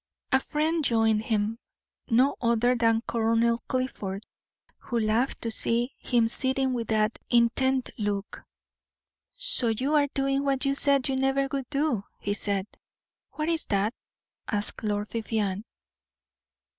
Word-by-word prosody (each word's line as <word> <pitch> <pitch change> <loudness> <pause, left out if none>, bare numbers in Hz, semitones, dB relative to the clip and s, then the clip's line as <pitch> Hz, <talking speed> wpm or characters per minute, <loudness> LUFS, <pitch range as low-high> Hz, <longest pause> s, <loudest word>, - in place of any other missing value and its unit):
A 265 - +5
friend 310 +3 -1
joined 225 -4 +2
him, 220 0 -1 0.5
no 255 +5 +3
other 235 +1 +3
than 230 -1 +2
Colonel 230 0 +2
Clifford, 215 -6 -3 0.6
who 240 -2 -2
laughed 225 +4 0
to 230 - -1
see 235 +3 +1
him 235 -2 +2
sitting 260 +2 +1
with 235 -2 -3
that 215 0 +1
intent 250 +2 +2
look. 205 -1 -3 0.9
"So - - +2
you 255 +6 0
are 290 -1 +4
doing 275 0 0
what 275 0 0
you 275 - +2
said 280 -1 +3
you 270 - 0
never 270 +1 +1
would 270 -3 -3
do," 280 -7 0 0.2
he 205 - -2
said. 200 -1 -2 0.7
"What 305 0 -3
is 330 -1 +1
that?" 200 +3 +1 0.5
asked 205 +1 -2
Lord 205 -1 -1
Vivianne. 215 -3 -2
235 Hz, 135 wpm, -27 LUFS, 220-270 Hz, 0.9 s, A